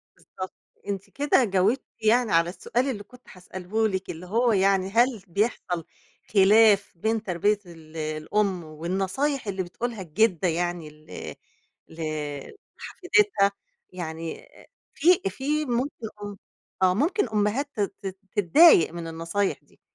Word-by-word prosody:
بالضبط. 185 0 -9 0.3
أنتِ 195 -1 -4
كده 280 -2 +2
جاوبتِ 205 +4 +1 0.2
يعني 225 +1 +3
على 165 +1 +3
السؤال 245 +8 -1
اللي 205 -5 -4
كنت 250 +3 -18
هاسأله 185 +4 -2
لِك، 190 -2 -4
اللي 170 +2 -7
هو 230 +6 +2
يعني 195 -1 +2
هل 235 0 +2
بيحصل 180 -3 -1 0.5
خِلاف 205 +1 +5
بين 220 +4 -1
تربية 205 +2 +1
ال 165 -2 -13
الأم 165 +5 -1
والنصايح 190 - -2
اللي 190 -2 -2
بتقولها 225 +5 -5
الجِدّة 185 +1 +1
يعني 175 -1 -2
ال 150 0 -9 0.5
ل - - -14 0.8
لحفيدتها؟ 360 - +2 0.4
يعني 165 -2 -6 0.5
في 335 - +3
في 295 +8 -1
ممكن 245 -1 -2 0.2
م 205 0 -6 0.5
آه. 185 -1 +5
ممكن 300 - +1
أمهات 220 +7 0
تت 205 -2 -1
تت 195 -1 -5 0.2
تتضايق 205 - +6
من 170 -1 -6
النصايح 165 +5 -2
دي. - - -28
200 Hz, 130 wpm, -25 LUFS, 175-235 Hz, 0.8 s, تتضايق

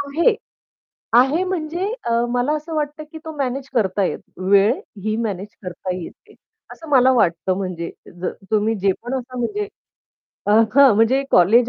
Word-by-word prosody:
आहे. 310 - +2 0.8
आहे 265 +9 +5
म्हणजे 355 0 -2 0.2
अ, - - -3 0.2
मला 245 +5 +1
असं 310 +2 -6
वाटतं, 300 0 -2
की 320 - -8
तो 320 - -5
मॅनेज 270 0 -2
करता 200 -4 +1
येतं. 185 - -5
वेळही 205 +1 +2
मॅनेज 200 -3 -3 0.2
करता 180 0 -4
येते. 180 -2 -10 0.4
असं 325 - -11
मला 260 -2 +5
वाटतं 185 -4 +1
म्हणजे 180 -3 -4 0.3
ज - - -3 0.3
तुम्ही 215 +1 +2
जे 195 +1 +3
पण 245 - -4
असं 255 -1 -4
म्हणजे 410 - -2 0.8
अ, 205 - +2 0.2
हां, 275 -5 +7
म्हणजे 235 +5 +3
कॉलेज 230 +7 +5
245 Hz, 155 wpm, -21 LUFS, 200-290 Hz, 0.8 s, हां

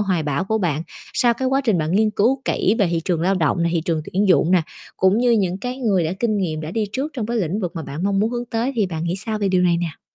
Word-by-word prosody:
hoài 185 -6 0
bão 145 +4 -1
của 220 +2 0
bạn? 165 -5 -1 0.3
Sau 240 -1 +3
cái 260 +1 -1
quá 270 +1 +2
trình 210 -7 +2
bạn 155 +2 -1
nghiên 215 +2 +3
cứu 245 +6 +1
kỹ 205 - +1
về 200 - +3
thị 170 - 0
trường 170 -3 0
lao 190 +3 +2
động 170 0 +1
nè, 170 - +2
thị 165 - +1
trường 165 -4 -1
tuyển 195 +2 +1
dụng 175 -2 +4
nè, 180 -3 +4 0.3
cũng 190 +3 +3
như 245 0 +3
những 190 -5 +1
cái 250 +4 -4
người 200 -9 +1
đã 160 - -1
kinh 225 -3 +1
nghiệm 160 -5 -2
đã 155 +1 -5
đi 220 +2 -1
trước 285 +4 -3
trong 230 -6 -3
cái 235 - -2
lĩnh 195 0 -1
vực 180 -2 -4
mà 160 - -3
bạn 150 +4 -6
mong 200 0 +1
muốn 220 +2 +1
hướng 240 0 -3
tới. 235 +3 -2
Thì 210 - +2
bạn 165 -2 -4
nghĩ 175 +2 -1
sao 215 +2 -3
về 200 -2 0
điều 185 -1 +2
này 175 -1 +3
nè? 170 -3 -4
195 Hz, 310 wpm, -21 LUFS, 170-225 Hz, 0.3 s, dụng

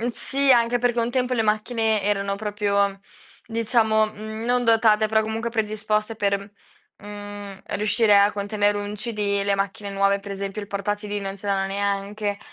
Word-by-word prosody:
mhmm, 240 - -1
sì, 275 +3 0
anche 240 -1 +4
perché 240 0 +1
un 235 +1 0
tempo 250 0 0
le 225 - +1
macchine 220 0 +1
erano 200 -1 0
proprio 200 -1 0 0.5
diciamo, 225 -1 +2
mhmm, 220 +1 -7
non 245 0 +2
dotate, 220 -1 +4
però 220 0 +2
comunque 220 +2 -3
predisposte 215 0 -1
per, 200 -1 -1 0.5
mhmm, 205 -1 -8 0.2
riuscire 210 0 +3
a 200 +1 +4
contenere 205 0 0
un 205 +1 -4
CD. 210 -2 -1
Le 200 - +2
macchine 200 +1 -3
nuove, 200 0 +2
per 200 0 -10
esempio, 195 +1 -4
il - - -7
porta 200 +1 -2
CD 205 0 -5
non 195 0 -5
ce 200 - -9
l'hanno 195 -1 +1
neanche. 200 +1 -2
210 Hz, 170 wpm, -24 LUFS, 200-225 Hz, 0.5 s, anche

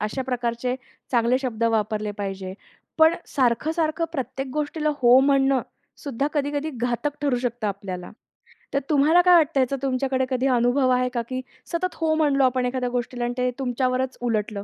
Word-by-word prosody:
अशा 215 +5 -2
प्रकारचे 245 -1 -2 0.4
चांगले 240 +1 +3
शब्द 235 -4 -2
वापरले 215 -1 0
पाहिजे. 195 -2 -4 0.4
पण 320 +1 +6
सारखं-सारखं 310 +6 0
प्रत्येक 265 -1 -4
गोष्टीला 300 +1 -1
हो 245 +1 +7
म्हणणं 270 -2 +3 0.4
सुद्धा 275 -1 -2
कधी-कधी 290 +1 -1
घातक 245 +5 -2
ठरू 280 -4 +2
शकतं 240 -2 -2
आपल्याला. 190 -3 -6 0.6
तर 280 - +2
तुम्हाला 305 +4 +5
काय 360 0 +6
वाटतं? 310 -3 +3
ह्याचं 260 +1 +1
तुमच्याकडे 260 -1 0
कधी 260 0 0
अनुभव 250 +1 +2
आहे 250 0 +2
का 240 - 0
की 255 0 -3 0.3
सतत 365 +1 -2
हो 320 -1 0
म्हणलो 290 -3 +2
आपण 255 0 +1
एखाद्या 250 0 -1
गोष्टीला 245 0 -3
आणि 240 - -2
ते 250 0 +1
तुमच्यावरच 255 0 -1
उलटलं? 215 -4 -1
255 Hz, 160 wpm, -24 LUFS, 240-280 Hz, 0.6 s, हो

